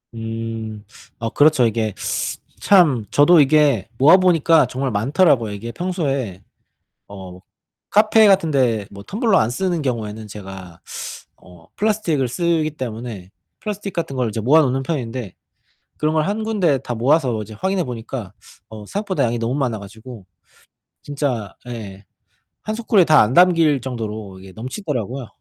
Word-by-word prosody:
음. 115 Hz, -1 st, -6 dB, 0.4 s
아 115 Hz, 0 st, -2 dB
그렇죠. 145 Hz, -3 st, +4 dB
이게 110 Hz, -2 st, -2 dB, 0.7 s
참 155 Hz, -, +4 dB
저도 155 Hz, +3 st, +6 dB
이게 140 Hz, -6 st, +3 dB
모아 155 Hz, +8 st, +7 dB
보니까 165 Hz, -3 st, +4 dB
정말 130 Hz, 0 st, -3 dB
많더라고요. 120 Hz, -, +2 dB
이게 115 Hz, +4 st, -6 dB
평소에 140 Hz, -, -3 dB, 0.7 s
어 95 Hz, -2 st, -10 dB, 0.5 s
카페 215 Hz, +1 st, +5 dB
같은데 135 Hz, -, +2 dB
뭐 100 Hz, 0 st, -10 dB
텀블러 215 Hz, -, +1 dB
안 110 Hz, -, +2 dB
쓰는 175 Hz, +4 st, -1 dB
경우에는 110 Hz, -4 st, -4 dB
제가 95 Hz, -4 st, -10 dB, 0.6 s
어 90 Hz, -3 st, -18 dB
플라스틱을 200 Hz, -, 0 dB
쓰기 165 Hz, +1 st, 0 dB
때문에 115 Hz, -8 st, -7 dB, 0.3 s
플라스틱 205 Hz, -2 st, -5 dB
같은 150 Hz, -6 st, -4 dB
걸 125 Hz, -3 st, 0 dB
이제 110 Hz, -, -4 dB
모아 145 Hz, +8 st, +5 dB
놓는 135 Hz, 0 st, 0 dB
편인데 125 Hz, -, -4 dB, 0.6 s
그런 155 Hz, +1 st, 0 dB
걸 155 Hz, -1 st, +2 dB
1 215 Hz, +2 st, -2 dB
군데 185 Hz, -11 st, +1 dB
다 120 Hz, -, -5 dB
모아서 125 Hz, -2 st, +1 dB
이제 110 Hz, -, -10 dB
확인해 190 Hz, -, -1 dB
보니까 115 Hz, -4 st, -6 dB, 0.4 s
어 105 Hz, -2 st, -10 dB
생각보다 200 Hz, -, -2 dB
양이 120 Hz, 0 st, -1 dB
너무 115 Hz, +3 st, -1 dB
많아 125 Hz, -6 st, -1 dB
가지고 110 Hz, 0 st, -12 dB, 0.8 s
진짜 135 Hz, -8 st, -3 dB
예 100 Hz, -4 st, -8 dB, 0.6 s
1 215 Hz, -, -3 dB
소쿠리에 220 Hz, -5 st, +3 dB
다 155 Hz, -, +6 dB
안 110 Hz, +4 st, +2 dB
담길 165 Hz, -5 st, +4 dB
정도로 110 Hz, -6 st, -6 dB
이게 95 Hz, 0 st, -13 dB
넘치더라고요. 125 Hz, -, -5 dB
130 Hz, 300 characters per minute, -20 LUFS, 110-165 Hz, 0.8 s, 모아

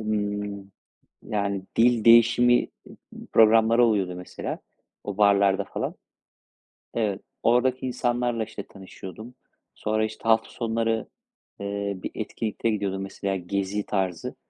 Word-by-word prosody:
ımm, 105 Hz, -2 st, -3 dB, 0.5 s
yani, 100 Hz, -2 st, -2 dB
dil 115 Hz, -1 st, +4 dB
değişimi 120 Hz, +1 st, +6 dB, 0.4 s
m -, -, -11 dB
programları 115 Hz, +2 st, +6 dB
oluyordu, 100 Hz, -5 st, +1 dB
mesela 90 Hz, -, -6 dB, 0.5 s
o 100 Hz, -1 st, -5 dB
barlarda 100 Hz, -1 st, +4 dB
falan. -, -, -4 dB, 1.0 s
Evet, 105 Hz, -4 st, -1 dB, 0.2 s
oradaki 130 Hz, +2 st, +2 dB
insanlarla 120 Hz, -2 st, 0 dB
işte 105 Hz, -, -7 dB
tanışıyordum. 100 Hz, +5 st, -11 dB, 0.4 s
Sonra 110 Hz, 0 st, 0 dB
işte 110 Hz, 0 st, -8 dB
hafta 115 Hz, 0 st, +3 dB
sonları, 115 Hz, -1 st, -1 dB, 0.5 s
eee, 100 Hz, 0 st, -3 dB
bir -, -, -4 dB
etkinlikte 115 Hz, +1 st, -3 dB
gidiyordum 100 Hz, -3 st, -2 dB
mesela, 95 Hz, 0 st, -3 dB
gezi 100 Hz, +2 st, -2 dB
tarzı. 95 Hz, -4 st, -2 dB
105 Hz, 110 wpm, -25 LUFS, 100-115 Hz, 1.0 s, değişimi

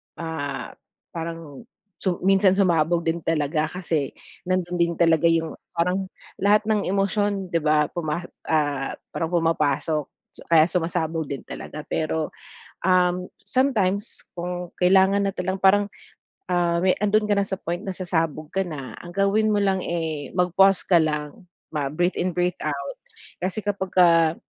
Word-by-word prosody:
ah, 150 Hz, -4 st, -4 dB, 0.4 s
parang 165 Hz, -, -7 dB, 0.3 s
su 185 Hz, -3 st, 0 dB
minsan 195 Hz, 0 st, +4 dB
sumabog 170 Hz, -3 st, +2 dB
din 165 Hz, +1 st, 0 dB
talaga 155 Hz, -1 st, 0 dB
kasi 160 Hz, -5 st, -2 dB, 0.3 s
nando'n 180 Hz, -1 st, -1 dB
din 170 Hz, 0 st, +2 dB
talaga 165 Hz, -1 st, +4 dB
yung 165 Hz, -1 st, +1 dB, 0.2 s
parang 180 Hz, +3 st, 0 dB, 0.3 s
lahat 205 Hz, +2 st, +4 dB
ng 215 Hz, -2 st, +1 dB
emosyon 195 Hz, 0 st, 0 dB
'di 165 Hz, -, +2 dB
ba? 150 Hz, -1 st, +2 dB
Puma 170 Hz, 0 st, -3 dB, 0.2 s
ah, 145 Hz, -3 st, 0 dB, 0.2 s
parang 165 Hz, -, -2 dB
pumapasok 155 Hz, -3 st, +1 dB, 0.2 s
so -, -, -14 dB
kaya 165 Hz, -2 st, +6 dB
sumasabog 165 Hz, -2 st, -1 dB
din 140 Hz, -1 st, -5 dB
talaga 150 Hz, 0 st, -8 dB
pero, 160 Hz, 0 st, -2 dB, 0.5 s
um, 180 Hz, 0 st, +3 dB, 0.2 s
sometimes 215 Hz, -6 st, 0 dB
kung 180 Hz, 0 st, -4 dB
kailangan 190 Hz, +2 st, +4 dB
na 195 Hz, -, 0 dB
talagang 185 Hz, +1 st, -2 dB
parang, 195 Hz, +2 st, +4 dB, 0.7 s
ah, 175 Hz, -1 st, +1 dB
me 185 Hz, 0 st, +3 dB
'ando'n 210 Hz, +1 st, +2 dB
ka 205 Hz, -, +3 dB
na 200 Hz, -, +1 dB
sa 195 Hz, -, -2 dB
point 170 Hz, +1 st, -2 dB
na 190 Hz, -, -3 dB
sasabog 165 Hz, -4 st, -2 dB
ka 195 Hz, -1 st, -1 dB
na, 145 Hz, -6 st, -7 dB
ang 175 Hz, 0 st, -10 dB
gawin 210 Hz, +2 st, +2 dB
mo 205 Hz, -, +2 dB
lang, 195 Hz, -1 st, +2 dB
eh, 160 Hz, -4 st, -3 dB
mag-pause 185 Hz, +2 st, +4 dB
ka 175 Hz, -3 st, +4 dB
lang, 150 Hz, +2 st, -2 dB, 0.2 s
mag-breathe 155 Hz, +4 st, -1 dB
in, 180 Hz, 0 st, -1 dB
breathe 180 Hz, 0 st, 0 dB
out. 140 Hz, -2 st, -3 dB, 0.4 s
Kasi 190 Hz, +4 st, -3 dB
kapagka, 180 Hz, -5 st, +3 dB
175 Hz, 145 wpm, -24 LUFS, 160-190 Hz, 0.7 s, kaya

